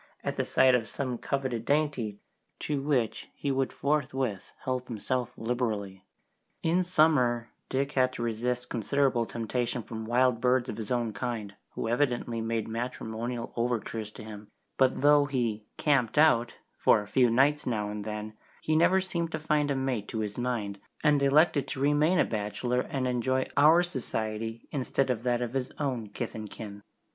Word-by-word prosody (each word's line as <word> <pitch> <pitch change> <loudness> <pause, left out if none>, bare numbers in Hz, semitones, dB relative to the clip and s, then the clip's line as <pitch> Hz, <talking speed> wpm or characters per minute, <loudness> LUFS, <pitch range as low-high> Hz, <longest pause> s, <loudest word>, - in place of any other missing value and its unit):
at - - -2
the - - -1
sight 130 -1 +4
of 115 -3 +2
some 130 +2 -3
coveted 130 -5 -2
dainty, 140 -8 0 0.4
to 145 -2 -2
which 135 -6 0
he 140 - -2
would 135 0 0
forthwith 135 -7 -1
help 130 -1 -2
himself 125 +2 -2
liberally. 110 -5 -2 0.6
In 175 +3 +3
summer 145 -9 +3 0.2
Dick 140 +1 0
had 130 -2 +2
to 120 - -4
resist 120 +2 -2
considerable 125 0 +1
temptation 120 +1 -2
from 110 0 -6
wild 125 0 +3
birds 125 0 +3
of 105 - -4
his 110 -2 -5
own 120 -3 0
kind, 105 -2 -4 0.2
who - - -3
evidently 120 -2 0
made 115 -1 -1
matrimonial 115 0 -4
overtures 115 -2 -2
to - - -10
him, 105 -1 -9 0.3
but 130 -1 +2
though 145 0 +6
he 120 -6 -1
"camped 135 -6 +2
out" 135 -6 +4 0.2
for - - +5
a - - -13
few 125 +1 +4
nights 140 +5 +3
now 105 -4 -1
and 105 0 -5
then, 105 0 -5 0.3
he 155 - +1
never 185 +4 +4
seemed 170 -3 -3
to - - -2
find 150 -1 +1
a 140 - +1
mate 130 -6 -1
to 110 - -3
his 105 -1 -3
mind, 115 -5 -2 0.2
and 150 -2 +4
elected 140 +1 +4
to - - -5
remain 150 +5 +3
a - - +4
bachelor 115 +4 -1
and 130 -2 -1
enjoy 130 +1 +1
our 160 +5 +6
society 115 -7 -4
instead 135 -1 0
of 115 -3 -2
that 120 0 +1
of 120 0 -4
his 130 -2 -2
own 130 -7 -2
kith - - -5
and 110 -1 -6
kin. 100 -2 -8
125 Hz, 170 wpm, -29 LUFS, 115-140 Hz, 0.6 s, though